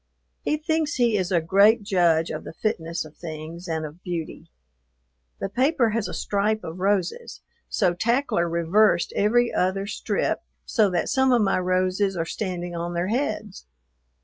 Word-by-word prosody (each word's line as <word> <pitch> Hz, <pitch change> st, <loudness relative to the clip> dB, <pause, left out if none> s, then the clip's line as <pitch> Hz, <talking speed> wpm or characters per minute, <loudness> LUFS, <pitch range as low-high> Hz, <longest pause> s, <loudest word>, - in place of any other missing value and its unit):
He 305 Hz, -, 0 dB
thinks 310 Hz, -1 st, -1 dB
he 240 Hz, -3 st, +2 dB
is 185 Hz, -3 st, -1 dB
a 175 Hz, -, +4 dB
great 200 Hz, +7 st, +4 dB
judge 170 Hz, -5 st, +2 dB
of -, -, -5 dB
the -, -, -9 dB
fitness 165 Hz, -6 st, -2 dB
of 155 Hz, -, -14 dB
things 165 Hz, +2 st, -8 dB
and 160 Hz, -1 st, -2 dB
of 155 Hz, +4 st, -10 dB
beauty. 170 Hz, -4 st, -5 dB, 0.9 s
The -, -, -2 dB
paper 255 Hz, -, +2 dB
has 225 Hz, -1 st, -1 dB
a -, -, -6 dB
stripe 210 Hz, +2 st, 0 dB
of 165 Hz, +3 st, -7 dB
roses, 200 Hz, -, -1 dB, 0.3 s
so 175 Hz, -, +2 dB
Tackler 230 Hz, -3 st, +1 dB
reversed 170 Hz, +4 st, +2 dB
every 235 Hz, +4 st, +2 dB
other 190 Hz, +2 st, 0 dB
strip 205 Hz, -, -1 dB, 0.3 s
so 215 Hz, -4 st, +2 dB
that 175 Hz, -2 st, -1 dB
some 265 Hz, -1 st, +3 dB
of 240 Hz, -3 st, +4 dB
my 195 Hz, -2 st, +2 dB
roses 185 Hz, +1 st, 0 dB
are 165 Hz, -, -1 dB
standing 175 Hz, -2 st, -4 dB
on 170 Hz, +1 st, -4 dB
their 175 Hz, +2 st, -1 dB
heads. 215 Hz, -, -3 dB
190 Hz, 165 wpm, -24 LUFS, 170-220 Hz, 0.9 s, a